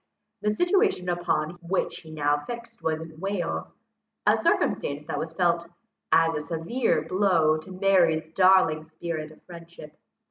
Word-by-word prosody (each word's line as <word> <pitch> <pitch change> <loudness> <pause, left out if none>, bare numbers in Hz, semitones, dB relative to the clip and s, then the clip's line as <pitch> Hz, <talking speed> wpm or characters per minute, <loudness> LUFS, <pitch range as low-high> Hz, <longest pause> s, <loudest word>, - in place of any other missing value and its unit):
The 210 - +1
situation 355 - +2
upon 175 -1 -1
which 180 +2 -1
he 160 - -14
now 145 -2 +1
fixed 235 +9 -8
was 160 -1 -1
in 160 -1 -10
Wales, 175 - -2 0.6
a - - +5
circumstance 145 +1 0
that - - -3
was 160 - -4
felt 170 0 +1 0.4
as 165 0 +4
a 150 - -2
severe 170 +11 -1
blow 175 -5 +2
to 185 +4 -12
Mary's 180 -5 +2
darling 185 -4 +4
spirit 160 -1 -5
of 155 - -18
friendship. 170 -3 -12
170 Hz, 145 wpm, -26 LUFS, 155-190 Hz, 0.6 s, a